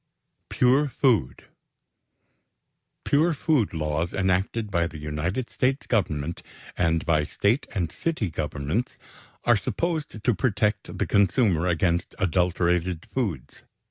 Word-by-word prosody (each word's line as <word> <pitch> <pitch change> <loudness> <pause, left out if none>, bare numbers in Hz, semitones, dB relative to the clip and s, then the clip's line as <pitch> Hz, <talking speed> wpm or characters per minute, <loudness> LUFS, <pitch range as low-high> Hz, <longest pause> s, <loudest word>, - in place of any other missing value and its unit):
=Pure 135 +4 +3
Food.= 120 - +1 1.6
Pure 160 +3 +2
food 145 -7 +1
laws 80 +1 -2
enacted 95 +3 0
by 85 -2 +1
the 80 - -9
United 75 +11 -3
States 135 +3 0
Government, 85 - -1 0.3
and 85 -1 +1
by 80 -2 +2
State 105 - 0
and 85 -5 -1
City 110 - -2
Governments, 80 - -3 0.5
are 120 - +5
supposed 150 - -3
to 120 - +3
protect 105 -1 -1
the - - 0
consumer 100 -4 +2
against 85 0 0
adulterated 90 -1 +1
foods. 100 - -3
95 Hz, 110 wpm, -25 LUFS, 85-120 Hz, 1.6 s, are